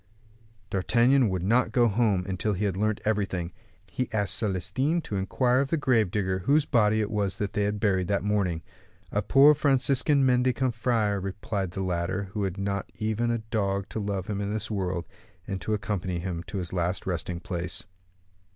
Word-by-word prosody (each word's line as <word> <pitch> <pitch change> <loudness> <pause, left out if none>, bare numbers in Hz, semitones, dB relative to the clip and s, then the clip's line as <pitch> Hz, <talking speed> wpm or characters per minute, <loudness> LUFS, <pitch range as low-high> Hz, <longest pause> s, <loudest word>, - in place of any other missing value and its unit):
D'Artagnan 120 +6 +3
would 95 -2 -2
not 115 +4 +3
go 120 +1 +4
home 105 -4 +1
until 95 +3 -1
he 100 +3 -1
had 95 -3 0
learnt 105 +2 0
everything. 95 -5 -1 0.3
He 125 - -4
asked 105 -3 0
Celestin 105 - 0
to 105 - -5
inquire 125 +6 +1
of 135 0 0
the 165 - +1
grave 120 -8 +2
digger 95 -1 -1
whose 145 +10 +3
body 110 -4 +3
it 105 - -2
was 100 -3 0
they 105 0 -1
had 105 0 -1
buried 95 -4 +1
that 100 0 0
morning. 100 -6 0 0.5
"A - - +1
poor 140 +2 +6
Franciscan 140 0 +2
mendicant 125 0 +2
friar," 110 -4 +1
replied 95 0 -3
the 95 +2 -4
latter, 90 +2 -2
"who 105 - -2
had 95 0 -3
not 100 0 -3
even 110 +2 -1
a 120 - +1
dog 100 -3 -1
to - - -4
love 100 -3 -2
him 100 0 -3
in 100 0 -2
this 110 0 -3
world, 90 -4 -2 0.4
and 95 -2 -4
to 110 +6 -1
accompany 95 -3 -2
him 85 -1 -3
to 100 - -5
his 90 -2 -4
last 90 +1 -1
resting 90 -1 -3
place." 90 0 -4
100 Hz, 185 wpm, -27 LUFS, 95-115 Hz, 0.5 s, poor